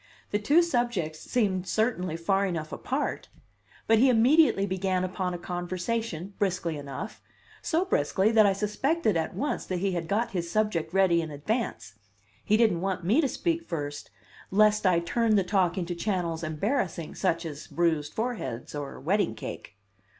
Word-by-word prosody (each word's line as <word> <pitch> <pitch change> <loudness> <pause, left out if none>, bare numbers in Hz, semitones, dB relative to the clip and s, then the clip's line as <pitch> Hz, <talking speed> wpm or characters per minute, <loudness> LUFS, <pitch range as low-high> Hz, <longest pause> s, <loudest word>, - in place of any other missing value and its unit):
The 205 - +1
two 295 +11 +4
subjects 240 - -1
seemed 190 -6 0
certainly 185 -6 0
far 195 +4 +1
enough 160 -4 -4
apart! 270 +3 -3 0.6
But 225 -1 +4
he 260 +3 +6
immediately 250 -2 +5
began 190 -1 -1
upon 185 -1 -2
a - - -3
conversation 180 +2 -3
briskly 180 -4 0
enough 140 -2 -7 0.4
so 345 +3 +1
briskly 190 - +2
that 220 -2 +6
I 195 - +3
suspected 215 - 0
at 160 -1 -1
once 295 +2 -2
he 190 +1 -1
had 170 -2 -3
got 215 +5 0
his 170 -3 -3
subject 175 -5 0
ready 185 -3 +3
in 160 - -5
advance; 150 - -3 0.5
he 215 - +3
didn't 220 -7 +3
want 190 -2 -2
me 230 - +4
to 285 - +2
speak 335 +3 -1
first, 145 - -5 0.4
lest 210 0 +4
I 175 -2 +3
turn 225 +5 +1
the 195 - +3
talk 180 -2 +1
into 175 -1 -2
channels 170 -3 -2
embarrassing, 170 - -2
such 170 -3 0
as 150 -2 -7
bruised 160 -4 0
foreheads 220 - -3
or 145 -2 -6
wedding 180 - +1
cake. 100 - -8
190 Hz, 160 wpm, -27 LUFS, 170-220 Hz, 0.6 s, he